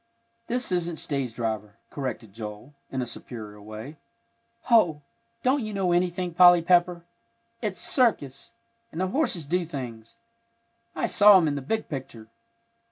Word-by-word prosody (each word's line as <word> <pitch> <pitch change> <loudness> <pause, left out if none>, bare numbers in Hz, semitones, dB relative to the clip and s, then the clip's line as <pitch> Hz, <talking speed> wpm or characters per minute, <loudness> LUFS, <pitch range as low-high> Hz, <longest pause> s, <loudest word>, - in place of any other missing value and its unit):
"This 245 -3 -1
isn't 175 -2 -1
stage 135 -7 -3
driver," 110 -3 -3 0.2
corrected 130 -7 -5
Joel, 105 +5 -8 0.2
in 130 -1 -2
a - - -4
superior 110 -3 -9
way. 110 +8 -9 0.7
"Hoh! 175 - +3 0.4
don't 260 +1 +2
you 215 -1 -5
know 190 -2 +1
anything, 175 0 0
Polly 175 0 +7
Pepper! 175 0 +2 0.6
It's 205 -5 -3
circus! 145 - 0 0.4
And 160 - -7
the 185 0 0
horses 190 - 0
do 175 +5 0
things. 120 -8 -8 0.8
I - - 0
saw 205 -2 +7
'em 170 -4 +2
in 145 - 0
the 140 - -3
big 220 +12 -2
picture." 120 -6 -8
160 Hz, 145 wpm, -26 LUFS, 120-185 Hz, 0.8 s, Polly